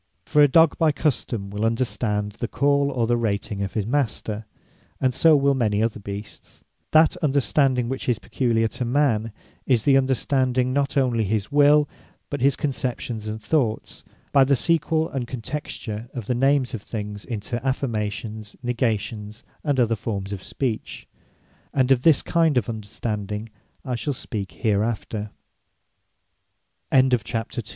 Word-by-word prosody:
For 150 - +3
a 145 - +8
dogge 160 +2 +4
by 160 -2 +4
custome 120 -9 -1
will 105 +1 -3
understand 115 -3 0
the 120 - -1
call, 140 +2 +2
or 120 -4 0
the 120 +1 +2
rating 105 -2 -2
of 100 - -4
his 105 -3 0
Master; 110 -4 -2 0.5
and 130 -1 +1
so 160 +3 +5
will 140 -1 +3
many 110 -5 +1
other 115 -1 -1
Beasts. 100 +1 -9 0.3
That 155 0 +5
Understanding 135 -2 +2
which 130 +1 -3
is 120 - +2
peculiar 115 -3 0
to 125 - -4
man, 120 -4 +1 0.4
is 120 -5 +3
the 135 -1 +5
Understanding 130 -1 +1
not 140 0 0
onely 125 -4 +2
his 105 +2 -1
will; 145 +1 +5 0.4
but 145 - -3
his 135 0 +4
conceptions 120 -4 -3
and 110 +1 -4
thoughts, 115 -2 -1 0.3
by 140 - +6
the 140 +1 +3
sequell 160 +2 +1
and 130 -3 -4
contexture 120 -3 -5
of 120 -5 -4
the 125 - 0
names 135 +1 +2
of 115 - -4
things 105 -1 -6
into 115 +1 -4
Affirmations, 110 -5 -3
Negations, 110 -2 -2 0.2
and 145 -3 +1
other 115 -2 +3
formes 100 -2 -4
of 95 - -6
Speech: 120 -1 -4 0.7
And 130 -1 +3
of 130 -2 +4
this 155 0 +4
kinde 165 -5 +2
of 120 - +1
Understanding 105 -1 -4 0.4
I 130 - -2
shall 135 +4 -2
120 Hz, 145 wpm, -24 LUFS, 110-140 Hz, 0.7 s, a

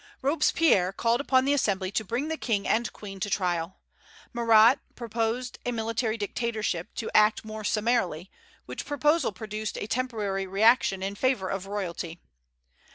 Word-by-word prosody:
Robespierre 285 - +3
called 230 +5 +1
upon 260 -2 +3
the 280 - +3
Assembly 195 -8 0
to 220 - -1
bring 240 +8 -2
the 320 - -2
King 215 -9 -1
and 235 +1 +1
Queen 195 -2 -9
to 205 - -2
trial. 180 -3 -1 0.6
Marat 230 +1 +6 0.2
proposed 235 +1 -3
a 245 - -1
military 225 0 -1
dictatorship, 215 -4 -2
to 225 - -4
act 215 +1 +4
more 215 0 -7
summarily, 205 -6 0 0.3
which - - -6
proposal 295 0 +1
produced 215 +2 -5
a - - -3
temporary 210 -5 -2
reaction 195 -1 +3
in 195 +1 -2
favor 205 -4 0
of 195 0 -4
royalty. 175 -4 -4
220 Hz, 150 wpm, -27 LUFS, 195-240 Hz, 0.6 s, Marat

